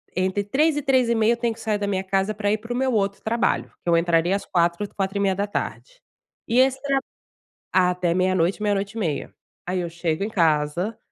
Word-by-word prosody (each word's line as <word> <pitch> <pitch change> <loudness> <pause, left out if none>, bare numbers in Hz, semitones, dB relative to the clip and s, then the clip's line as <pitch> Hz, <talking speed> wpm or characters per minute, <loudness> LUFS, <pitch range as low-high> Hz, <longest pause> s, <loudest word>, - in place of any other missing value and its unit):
entre 190 +2 0
15:00 290 +9 +2
e 295 - 0
15:30 235 -4 +3
eu 235 - -3
tenho 235 -1 0
que - - -16
sair 215 -2 0
da 205 0 -2
minha 190 -1 -1
casa, 195 +2 0
pra 205 -1 -1
ir 215 - +2
pro 230 +3 -6
meu 260 +1 +1
outro 200 -2 0
trabalho, 230 +2 0
que 175 - -2
eu 170 - +5
entraria 170 +2 +2
às 200 - -4
16:00, 170 +3 +1
16:30 195 0 0
da 200 +1 0
tarde. - - -5 0.5
E 240 +2 +2
esse 265 0 +3
trab 275 -1 +1 0.7
até 180 -2 +2
meia 185 +1 +2
noite, 185 +4 +1
meia 205 -1 +2
noite 200 +1 -2
e 230 - -5
meia. 160 -8 -3 0.3
Aí 180 +1 -1
eu 175 - -3
chego 165 0 -2
em 215 - -3
casa, 165 +3 +1
200 Hz, 215 wpm, -23 LUFS, 180-230 Hz, 0.7 s, eu